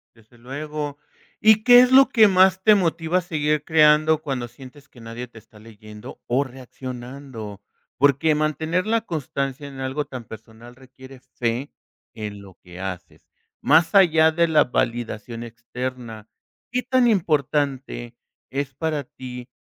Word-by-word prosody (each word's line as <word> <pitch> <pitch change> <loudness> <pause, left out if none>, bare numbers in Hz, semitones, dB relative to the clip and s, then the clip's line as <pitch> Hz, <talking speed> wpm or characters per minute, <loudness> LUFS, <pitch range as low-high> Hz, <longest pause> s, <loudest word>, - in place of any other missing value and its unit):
Desde 115 +1 -23
luego, 145 +3 -6 0.4
¿y 220 0 +5
qué 245 0 +9
es 250 - +4
lo 270 +1 +7
que 220 -3 +6
más 190 0 +4
te 215 +1 +6
motiva 170 -2 0
a - - 0
seguir 150 -4 -1
creando 155 0 +4
cuando 130 -5 -4
sientes 130 +4 -15
que 120 - -17
nadie 115 +2 -7
te 115 -2 -15
está 110 0 -19
leyendo 105 -1 -13
o 130 +4 +1
reaccionando?, 125 -4 -9 0.3
porque 145 +3 +3
mantener 155 +4 -1
la 225 0 +1
constancia 140 - -4
en 135 - -11
algo 130 +3 -3
tan 125 -3 -8
personal 110 +2 -13
requiere 130 0 -15
fe 125 +1 -4 0.4
en 105 -3 -7
lo 95 -2 -15
que 90 0 -12
haces, 90 -2 -8 0.4
más 165 +2 +3
allá 160 -5 +5
de 170 +1 +2
la 155 -1 +4
validación 115 -1 -3
externa, 120 -1 -7 0.4
¿qué 250 +1 0
tan 255 0 +2
importante 140 - -1 0.4
es 135 -1 -4
para 155 -1 -2
ti 125 0 -10
135 Hz, 145 wpm, -22 LUFS, 120-160 Hz, 0.4 s, qué